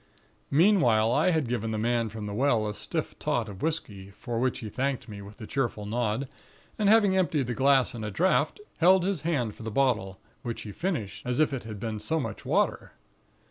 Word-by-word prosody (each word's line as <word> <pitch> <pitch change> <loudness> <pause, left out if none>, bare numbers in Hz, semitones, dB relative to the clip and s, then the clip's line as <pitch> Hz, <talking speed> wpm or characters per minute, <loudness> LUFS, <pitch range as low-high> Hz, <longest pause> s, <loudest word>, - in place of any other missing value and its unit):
"Meanwhile, 135 - +4
I 185 - +3
had 160 -7 +1
given 115 -2 -2
the 110 - -2
man 115 +1 0
from 110 0 -6
the 105 - -4
well 115 -2 +2
a 105 - -3
stiff - - -4
tot 120 -2 0
of 100 -2 -9
whisky; 105 -12 -3
for 115 +3 -5
which 130 0 +1
he 110 - -6
thanked 135 +2 -2
me 105 -2 -8
with 100 +3 -12
a 110 - -7
cheerful 120 -5 -2
nod, 115 +3 -1 0.5
and 205 -2 +3
having 205 -3 +5
emptied 165 -7 +1
the 120 - -2
glass 135 +1 +3
at 115 -2 -6
a 105 - -2
draft, 185 - +1 0.2
held 185 +2 +5
his 190 -5 -1
hand 140 -10 -1
for - - -14
the 110 - -4
bottle, 110 -6 0 0.2
which 120 -3 -5
he 105 - -7
finished, 150 - -3
as 125 +2 -1
if 155 -2 +3
it 125 -4 -4
had 110 -2 -7
been 110 0 -4
so 160 +10 -1
much 115 -7 -5
water. - - 0
120 Hz, 215 wpm, -28 LUFS, 110-150 Hz, 0.5 s, having